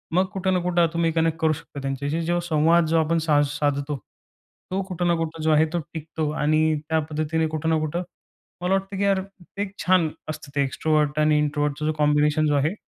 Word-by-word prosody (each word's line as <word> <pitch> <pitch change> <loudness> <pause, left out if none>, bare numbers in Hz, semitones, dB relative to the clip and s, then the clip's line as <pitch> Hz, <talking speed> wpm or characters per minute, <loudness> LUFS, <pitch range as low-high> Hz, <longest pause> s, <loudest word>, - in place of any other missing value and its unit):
मग 185 - +4
कुठे 190 -1 0
ना 180 - +2
कुठं 175 -1 +3
तुम्ही 170 -1 +1
कनेक्ट 165 0 +1
करू 160 -1 +3
शकता 140 -1 -9
त्यांच्याशी. 140 +4 -2
जो 175 +1 +1
संवाद 160 +2 +4
जो 165 0 +3
आपण 165 +2 0
साज 145 -1 +4
साधतो. 145 0 0 0.8
तो 195 +1 0
कुठं 175 -1 -1
ना 170 - +3
कुठं 165 -1 -4
जो 160 - +3
आहे, 155 +1 +5
तो 175 - +1
टिकतो 160 -1 -3
आणि 155 +1 +3 0.3
त्या 160 0 +2
पद्धतीने 155 +1 0
कुठं 155 +1 -2
ना 160 -1 +2
कुठं 155 +4 -2 0.6
मला 180 +2 +1
वाटते, 195 0 -1
की 200 - 0
यार 195 -1 +3
एक-एक 195 +1 -7
छान 180 -3 +4 0.2
असतं 155 -2 -7
ते 140 - +2
एक्स्ट्रोव्हर्ट 150 +2 0
आणि 150 0 +4
इंट्रोव्हर्टचं 150 0 -1
जो 155 - +1
कॉम्बिनेशन 150 +1 +3
जो 145 - +2
आहे. 145 +6 +1
160 Hz, 205 wpm, -24 LUFS, 150-170 Hz, 0.8 s, आहे